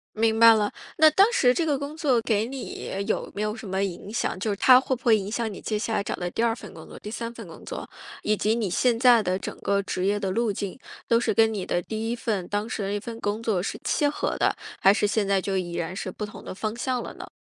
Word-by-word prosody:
明 220 0 +2
白 230 0 +9
了。 210 -1 +1 0.3
那 315 0 +8
当 385 +6 +6
时 250 - +4
这 335 - +1
个 290 -4 +1
工 285 +2 -6
作 275 -7 +2
给 220 -1 0
你 265 +1 -6 0.2
有 - - -1
没 205 - -5
有 215 +1 -2
什 220 - -9
么 190 +1 -1
影 195 +2 -4
响？ 205 - -1
就 210 +3 -1
是 200 - -1
它 255 +4 +7
会 260 0 -1
不 235 - -11
会 230 -2 +6
影 200 -1 -4
响 230 -2 -2
你 - - -8
接 215 -1 -2
下 225 +1 -2
来 200 - +1
找 - - -4
的 180 -1 -3
第 225 - -2
2 230 -1 +2
份 - - -11
工 - - -11
作， - - -11
第 210 - -8
3 230 +1 -4
份 - - -10
工 - - -12
作？ - - -6 0.3
以 215 - +1
及 215 +2 +1
你 225 -4 -1
现 235 +6 +2
在 240 -2 +6
的 185 -1 0
整 - - -6
个 200 0 +1
职 185 -1 -3
业 205 +1 +1
的 195 -2 -1
路 225 +1 +1
径， 200 +4 -5 0.3
都 230 - +4
是 240 - +1
跟 220 +1 +4
你 195 -3 -3
的 175 - 0
第 220 +3 -4
1 240 - -1
份 210 -6 -2
当 205 +2 -2
时 215 - -3
的 195 - -2
那 205 +1 -2
份 230 +2 -7
工 210 +1 -2
作 205 -6 0
是 - - -4
契 295 - +1
合 290 - -1
的， - - +2 0.3
还 195 - +7
是 210 0 +1
现 210 0 0
在 195 -1 +2
就 195 0 -2
已 175 -2 -2
然 170 +2 -3
是 190 - -4
不 210 +3 -5
同 210 - -11
的 - - -6
方 215 +3 -3
向 250 0 -1
了 - - -8
呢？ - - -9
220 Hz, 300 characters per minute, -25 LUFS, 200-235 Hz, 0.3 s, 白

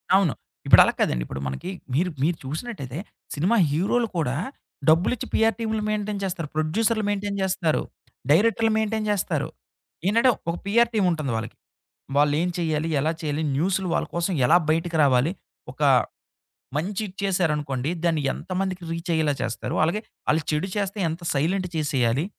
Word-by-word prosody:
అవును. 190 -7 +3 0.3
ఇప్పుడు - - +9
అలా - - +1
కాదండి. - - +1
ఇప్పుడు 70 - -6
మనకి, 70 - -5 0.2
మీరు 180 +6 +2
మీరు 165 +1 +1
చూసినట్టయితే 150 - -5 0.4
సినిమా 185 +11 +2 0.2
హీరోలు 210 +9 +1
కూడా 135 -5 0 0.5
డబ్బులిచ్చి, 180 +9 +2
పీఆర్‌టీమ్‌లు 220 0 +1
మెయింటైన్ 210 -1 -2
జేస్తారు. 175 -5 -3
ప్రొడ్యూసరులు 215 +8 +1
మెయింటైన్ 200 0 -2
జేస్తారు. 180 -4 +1 0.5
డైరెక్టరులు 225 +5 +4
మెయింటైన్ 220 0 0
జేస్తారు. 205 -3 0 0.6
ఏంటంటే 230 +5 +4 0.2
ఒక 170 - 0
పీఆర్ 235 +3 +4
టీముంటుంది 170 - +1
వాళ్ళకి. 110 - -5 0.6
వాళ్ళు 145 0 +4
ఏం 180 - +1
చేయాలి? 160 -1 0
ఎలా 155 +4 +1
చేయాలి? 155 0 -2
న్యూసులు 185 +3 0
వాళ్ళ - - 0
కోసం 170 +2 0
ఎలా 170 - +6
బయటకి 165 +1 0
రావాలి? 135 +2 +4 0.4
ఒక - - -8 0.9
మంచి 195 +7 -2
ఇచ్చేసారనుకోండి. 160 -8 -1
దాన్ని 160 -3 +2
ఎంతమందికి 185 -1 -3
రీచయ్యేలా 165 -3 0
చేస్తారు? 120 -3 -3
అలాగే 175 +7 0 0.3
ఆళ్లు 155 +1 +2
చెడు 160 +6 0
చేస్తే, 200 0 -2
ఎంత 165 +3 -5
సైలెంట్ 180 +6 0
చేసేయాలి? 135 -2 +1
175 Hz, 140 wpm, -24 LUFS, 150-200 Hz, 0.9 s, ఇప్పుడు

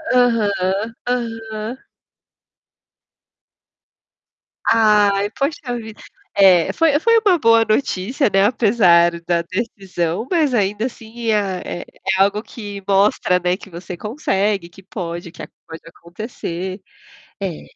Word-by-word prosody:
Aham, 215 -3 +1 0.2
aham. 225 -1 -4 2.9
Ai, 205 -2 +3
pode 285 +4 -2
ter 250 -4 -6
ouvido, 220 -3 -6 0.3
é, 185 -4 +5
foi 310 -3 +3
foi 460 +5 +4
uma 365 -3 +5
boa 230 -2 +5
notícia, 220 - 0
né, 195 +1 +4
apesar 185 -7 +4
da 170 0 0
decisão, 185 0 -3
mas 310 -7 +2
ainda 210 +1 0
assim 230 -1 -5
é 190 -4 -2
é - - -21 0.4
algo 205 +2 +2
que 205 -5 -8
mostra 195 -2 +3
não 180 0 0
é 185 - 0
que 200 - -13
você 175 +1 -8
consegue, 205 - -1
que 195 +2 -17
pode 170 -3 -6
que - - -9 0.2
pode 160 0 -9
acontecer. 185 +1 -7 0.6
É. 185 -5 -4
205 Hz, 120 wpm, -19 LUFS, 185-230 Hz, 2.9 s, é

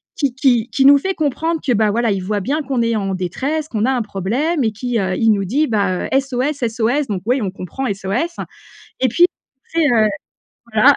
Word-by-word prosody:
qui 280 -4 0
qui 245 -3 +2
qui 275 - +2
nous 280 +1 +8
fait 380 +7 -2
comprendre 320 +1 -1
que, 255 - +2
ben, 215 -1 +2
voilà, 235 +2 +1
il 195 -2 -2
voit 205 +2 -1
bien 285 +10 -1
qu'on 260 -3 -1
est 230 0 +1
en 195 -2 -1
détresse, 265 - -2
qu'on 220 -6 -1
a 260 - +2
un 255 -2 0
problème 235 - -1
et 220 - +1
qui, 240 +3 -3
heu, 190 -2 -1
il 225 +2 +2
nous 200 -2 +1
dit, 285 +11 +1
bah, 200 -5 0
heu: - - -3
«SOS, 270 +1 -2
SOS!» 235 +6 0
donc, 195 -4 -3
ouais, 250 +3 +2
on 200 -6 -2
comprend 195 +8 -6
«SOS» 200 - -3 0.6
et 260 - +3
puis, 295 +9 +4 0.5
tu 330 - +2
sais, 315 - +4
heu 225 -4 +4 0.7
voilà! 255 +7 +6
240 Hz, 225 wpm, -18 LUFS, 210-280 Hz, 0.7 s, nous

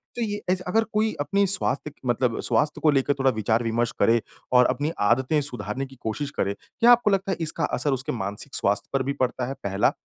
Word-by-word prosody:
तो 240 - -3
ये 205 -2 -2
एज़ 185 0 +1
अगर 225 +4 +2
कोई 215 +1 +1
अपनी 200 +7 +1
स्वास्थ्य 165 -6 -1
कि - - -32
मतलब 120 -1 +1
स्वास्थ्य 150 0 0
को 155 - +4
लेकर 140 0 +2
थोड़ा 135 -1 +3
विचार-विमर्श 115 +2 0
करे 115 0 +4 0.3
और 125 0 +7
अपनी 150 +2 -1 0.2
आदतें 130 +5 +2
सुधारने 135 -1 -3
की 135 0 -14
कोशिश 140 +6 -3
करे, 100 +1 0
क्या 235 - +2
आपको 240 -3 +5
लगता 195 0 0
है - - -1
इसका 165 0 -2
असर 145 - +1
उसके 135 +4 -2
मानसिक 105 +4 -5
स्वास्थ्य 100 +1 0
पर 135 -1 +1
भी 140 - -2
पड़ता 125 0 0
है? 135 - -3
पहला 95 0 +2
135 Hz, 215 wpm, -25 LUFS, 120-180 Hz, 0.3 s, और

